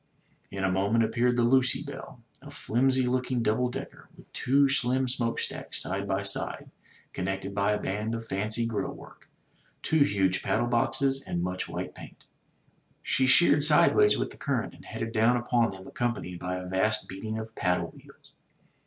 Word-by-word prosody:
In 95 Hz, 0 st, -5 dB
a 95 Hz, -, +2 dB
moment 100 Hz, +5 st, +2 dB
appeared 120 Hz, +2 st, +1 dB
the 120 Hz, -, +3 dB
Lucy 130 Hz, +1 st, +3 dB
Belle, 135 Hz, -3 st, -9 dB, 0.2 s
a 145 Hz, -, -11 dB
flimsy 130 Hz, -1 st, +1 dB
looking 125 Hz, -1 st, 0 dB
double 115 Hz, +3 st, +1 dB
decker, 135 Hz, +2 st, -8 dB
with -, -, -18 dB
two 140 Hz, +2 st, +3 dB
slim 130 Hz, -1 st, +1 dB
smokestacks 120 Hz, -2 st, -2 dB
side -, -, -3 dB
by -, -, -1 dB
side -, -, -3 dB, 0.4 s
connected 95 Hz, +1 st, -3 dB
by 100 Hz, +1 st, +1 dB
a 105 Hz, -, -1 dB
band 105 Hz, +4 st, -2 dB
of 115 Hz, 0 st, -6 dB
fancy 110 Hz, +4 st, -1 dB
grill 115 Hz, -2 st, -2 dB
work, -, -, -15 dB, 0.5 s
two 160 Hz, -, +2 dB
huge 95 Hz, -6 st, +1 dB
paddle 120 Hz, -, 0 dB
boxes 130 Hz, +3 st, +1 dB
and 85 Hz, -8 st, -3 dB
much 90 Hz, +1 st, -3 dB
white -, -, -5 dB
paint. -, -, -13 dB, 0.8 s
She 130 Hz, -1 st, +1 dB
sheered 145 Hz, 0 st, +6 dB
sidewise 170 Hz, -, +5 dB
with -, -, -2 dB
the -, -, -12 dB
current -, -, -2 dB
and -, -, -16 dB
headed 115 Hz, -, -5 dB
down 115 Hz, +2 st, +3 dB
upon 120 Hz, -1 st, +1 dB
them 95 Hz, 0 st, -10 dB
accompanied 110 Hz, -8 st, -3 dB
by 90 Hz, 0 st, -3 dB
a 90 Hz, 0 st, -5 dB
vast 105 Hz, +4 st, 0 dB
beating 110 Hz, +3 st, -5 dB
of 110 Hz, 0 st, -7 dB
paddle 90 Hz, -5 st, 0 dB
wheels. -, -, -18 dB
115 Hz, 170 wpm, -28 LUFS, 100-130 Hz, 0.8 s, sheered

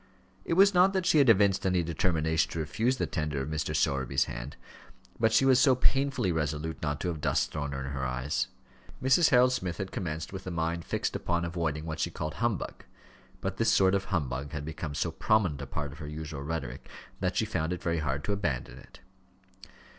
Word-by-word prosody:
It -, -, 0 dB
was 200 Hz, +2 st, +6 dB
not 185 Hz, +2 st, +5 dB
that 190 Hz, -2 st, 0 dB
she 155 Hz, -, +5 dB
had 135 Hz, -4 st, +5 dB
evinced 100 Hz, -2 st, +4 dB
any 90 Hz, -2 st, +2 dB
determination 80 Hz, -1 st, 0 dB
to -, -, -5 dB
refuse 110 Hz, -, 0 dB
the -, -, 0 dB
tender 75 Hz, -4 st, -2 dB
of 65 Hz, +2 st, -3 dB
Mr. 75 Hz, -1 st, -2 dB
Sowerby's 65 Hz, 0 st, +1 dB
hand; -, -, -7 dB, 0.6 s
but 110 Hz, 0 st, +3 dB
she 115 Hz, +4 st, +4 dB
was 130 Hz, -1 st, +5 dB
so 130 Hz, -1 st, +5 dB
painfully 135 Hz, -5 st, +1 dB
resolute 80 Hz, 0 st, -2 dB
not 75 Hz, -2 st, -2 dB
to 90 Hz, -, -1 dB
have 80 Hz, -3 st, -4 dB
dust -, -, +1 dB
thrown 70 Hz, -2 st, -3 dB
in 65 Hz, -1 st, -4 dB
her 65 Hz, 0 st, -4 dB
eyes! 65 Hz, +3 st, -1 dB, 0.5 s
Mrs. 135 Hz, +6 st, +4 dB
Harold 125 Hz, -2 st, +5 dB
Smith 90 Hz, -9 st, -3 dB
had 95 Hz, -2 st, -4 dB
commenced 80 Hz, 0 st, -4 dB
with 95 Hz, -1 st, -7 dB
a -, -, -1 dB
mind 85 Hz, 0 st, -2 dB
fixed -, -, -2 dB
upon 85 Hz, -1 st, -1 dB
avoiding 80 Hz, -3 st, -2 dB
what 80 Hz, -1 st, -5 dB
she 85 Hz, -, 0 dB
called 75 Hz, -2 st, -4 dB
humbug; 120 Hz, -4 st, -2 dB, 0.6 s
but -, -, -3 dB
this -, -, +3 dB
sort 95 Hz, -1 st, +4 dB
of 100 Hz, 0 st, +1 dB
humbug 70 Hz, -6 st, -2 dB
had 75 Hz, -1 st, -4 dB
become 80 Hz, -1 st, -5 dB
so -, -, -1 dB
prominent 95 Hz, -10 st, +1 dB
a 70 Hz, -, -6 dB
part 75 Hz, +1 st, -4 dB
of 75 Hz, -, -12 dB
her 75 Hz, -, -6 dB
usual 75 Hz, -1 st, -6 dB
rhetoric, 70 Hz, -4 st, -5 dB, 0.3 s
that 90 Hz, -1 st, -1 dB
she 110 Hz, -, +2 dB
found 85 Hz, -6 st, -2 dB
it 90 Hz, -, -4 dB
very 85 Hz, -1 st, 0 dB
hard 70 Hz, -2 st, -2 dB
to 100 Hz, -, -1 dB
abandon 65 Hz, -10 st, -3 dB
it. -, -, -17 dB
80 Hz, 210 wpm, -29 LUFS, 75-100 Hz, 0.6 s, was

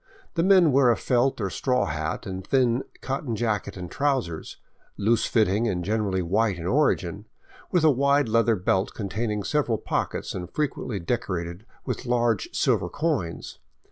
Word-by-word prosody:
The 165 Hz, -, +1 dB
men 185 Hz, -3 st, +5 dB
wear 135 Hz, -1 st, +5 dB
a 115 Hz, -, +3 dB
felt 125 Hz, +1 st, +1 dB
or 95 Hz, -3 st, -2 dB
straw 125 Hz, -1 st, +1 dB
hat 80 Hz, +1 st, -3 dB
and 95 Hz, -1 st, -5 dB
thin 125 Hz, -1 st, +2 dB, 0.2 s
cotton 135 Hz, -3 st, -3 dB
jacket 105 Hz, -3 st, -2 dB
and 90 Hz, -2 st, -7 dB
trousers, 130 Hz, -, -1 dB, 0.4 s
loose 110 Hz, +2 st, +2 dB
fitting 110 Hz, 0 st, +2 dB
and 90 Hz, -5 st, -2 dB
generally 100 Hz, -3 st, 0 dB
white 100 Hz, +3 st, +1 dB
in 85 Hz, -, -6 dB
origin, 105 Hz, -, +1 dB, 0.4 s
with 180 Hz, -4 st, +2 dB
a 155 Hz, -, +6 dB
wide 140 Hz, +1 st, +3 dB
leather 115 Hz, 0 st, +3 dB
belt 95 Hz, +1 st, 0 dB
containing 105 Hz, 0 st, -2 dB
several 130 Hz, -3 st, 0 dB
pockets -, -, -3 dB
and 90 Hz, -1 st, -6 dB
frequently 130 Hz, -7 st, -2 dB
decorated 85 Hz, -1 st, -3 dB, 0.2 s
with 125 Hz, 0 st, -4 dB
large 120 Hz, -3 st, +1 dB
silver -, -, +1 dB
coins. 145 Hz, -, -2 dB
115 Hz, 155 wpm, -25 LUFS, 95-130 Hz, 0.4 s, a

